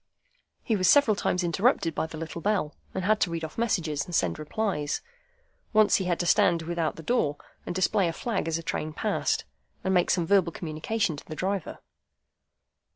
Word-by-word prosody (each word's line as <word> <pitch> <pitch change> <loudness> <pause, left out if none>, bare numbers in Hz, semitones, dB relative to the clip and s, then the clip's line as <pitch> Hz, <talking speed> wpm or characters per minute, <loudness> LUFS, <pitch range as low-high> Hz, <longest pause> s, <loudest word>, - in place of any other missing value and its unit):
He 225 - +1
was 185 -3 +3
several 285 -7 +6
times 180 -2 0
interrupted 175 -1 +2
by 160 - -1
the 160 - -8
little 165 +1 -6
bell, 200 -7 0 0.2
and 190 - -2
had 215 +1 +3
to 180 - +2
read 165 -1 -4
off 155 - -6
messages, 170 -11 0
and 175 - -5
send - - +1
replies. 155 -2 -2 0.7
Once 215 -1 +5
he 190 - -2
had 175 -1 0
to - - -1
stand 170 -1 +3
without 165 -1 -1
the 165 - -10
door, 150 - +1 0.3
and - - -3
display 185 0 +2
a 165 - -2
flag 205 -3 -2
as 165 0 0
a 165 - -7
train 155 -1 -3
passed, - - 0 0.4
and 190 - +1
make 180 -1 +3
some 175 -3 +2
verbal 185 -2 +3
communication 165 +3 -2
to - - -11
the 155 - -7
driver. 190 0 -3
175 Hz, 195 wpm, -27 LUFS, 160-200 Hz, 0.7 s, several